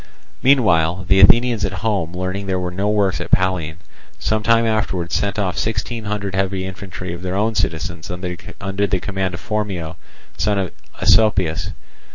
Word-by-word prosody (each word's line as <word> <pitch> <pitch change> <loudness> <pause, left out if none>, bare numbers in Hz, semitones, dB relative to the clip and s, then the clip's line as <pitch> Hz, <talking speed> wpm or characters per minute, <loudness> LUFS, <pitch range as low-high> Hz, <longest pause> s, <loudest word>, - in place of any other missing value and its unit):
Meanwhile 95 - +3
the 95 0 +4
Athenians 115 +3 +5
at - - -1
home 95 -6 0
learning 95 +2 -3
that 95 - 0
there 95 - 0
were 90 -1 -3
no 100 +3 -1
works 100 -3 +1
at - - -6
Pallene, 90 -4 +1 0.4
some 110 0 0
time 115 +1 +3
afterwards 95 -6 -1
sent 100 +1 0
off 95 -4 -1
sixteen 110 +1 -2
hundred 100 -1 -3
heavy 95 0 -1
infantry 95 -2 -6
of 85 - -7
their 90 0 -3
own 110 +3 +1
citizens 80 -4 -2
under 90 +2 -3
the 95 0 0
command 95 -1 -2
of - - -7
Phormio, 100 -7 -3 0.4
son 105 -1 +1
of 95 -2 -1 0.3
Asopius. 95 -7 +3
95 Hz, 170 wpm, -20 LUFS, 90-105 Hz, 0.4 s, Athenians